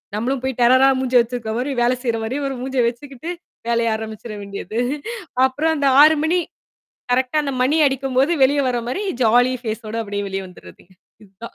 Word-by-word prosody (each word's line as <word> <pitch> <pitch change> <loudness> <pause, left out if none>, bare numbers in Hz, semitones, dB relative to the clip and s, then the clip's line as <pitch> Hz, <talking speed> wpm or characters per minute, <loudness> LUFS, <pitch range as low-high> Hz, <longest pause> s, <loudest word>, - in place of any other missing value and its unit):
நம்மளும் 250 +4 -1
போய் 265 0 -1
டெரரா 260 +3 +5
மூஞ்சிய 255 -1 +3
வச்சிருக்கிறமாரி 240 +2 -3
வேல 240 +1 +3
செய்றமாரி 230 +1 -2
ஒரு 270 - -4
மூஞ்ச 265 +1 -5
வச்சுக்கிட்டு, 270 +6 -6 0.4
வேலைய 230 -1 +1
ஆரம்பிச்சிற 220 0 -7
வேண்டியது. 200 +2 -5 0.7
அப்புறம் 310 +5 0
அந்த 280 -1 +1
6:00 310 +1 +6
மணி 340 +3 +2 0.8
கரெக்ட்டா 260 +4 +1
அந்த 275 - -3
மணி 285 +5 +2
அடிக்கும்போது 270 +2 +1
வெளியே 280 +2 +4
வரமாரி 245 - -2 0.2
ஜாலி 245 +3 +4
ஃபேஸோட 220 -1 -5
அப்பிடியே 205 -1 -4
வெளியே 195 0 -4
வந்துர்றதுங்க, 180 0 -16 0.3
இதுதான் 200 +4 -12
245 Hz, 150 wpm, -20 LUFS, 225-270 Hz, 0.8 s, 6:00